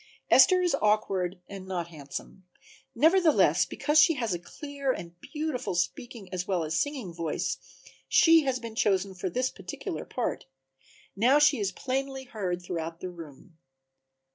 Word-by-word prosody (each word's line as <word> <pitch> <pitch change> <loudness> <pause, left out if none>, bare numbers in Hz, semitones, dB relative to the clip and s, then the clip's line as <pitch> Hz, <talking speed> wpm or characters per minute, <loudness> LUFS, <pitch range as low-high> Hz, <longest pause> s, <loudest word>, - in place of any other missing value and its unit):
Esther 365 -1 +7
is 355 - +1
awkward 195 -4 +1
and 195 -1 -9
not 175 -3 -3
handsome; 155 +4 -9 0.5
nevertheless, 325 +5 +4
because 300 +1 +2
she 330 +1 +6
has 230 -7 -1
a 175 - -3
clear 280 - -4
and 170 -8 -6
beautiful 300 - -3
speaking 200 +4 -3
as 180 0 -3
well 185 -4 0
as 155 0 -3
singing 255 - -2
voice 165 -2 -2 0.5
she 330 -1 +6
had 265 -3 -1
been 230 -1 -6
chosen 195 -3 +1
for 185 0 -4
this 255 +7 -1
particular 395 -8 -6
part. 245 - -4 0.7
Now 245 +8 +4
she 295 -3 +4
is 200 -2 -1
plainly 265 +4 -3
heard 185 -7 -4
throughout 165 -2 -5
the 185 - -5
room. 165 0 -13
210 Hz, 150 wpm, -28 LUFS, 180-275 Hz, 0.7 s, Esther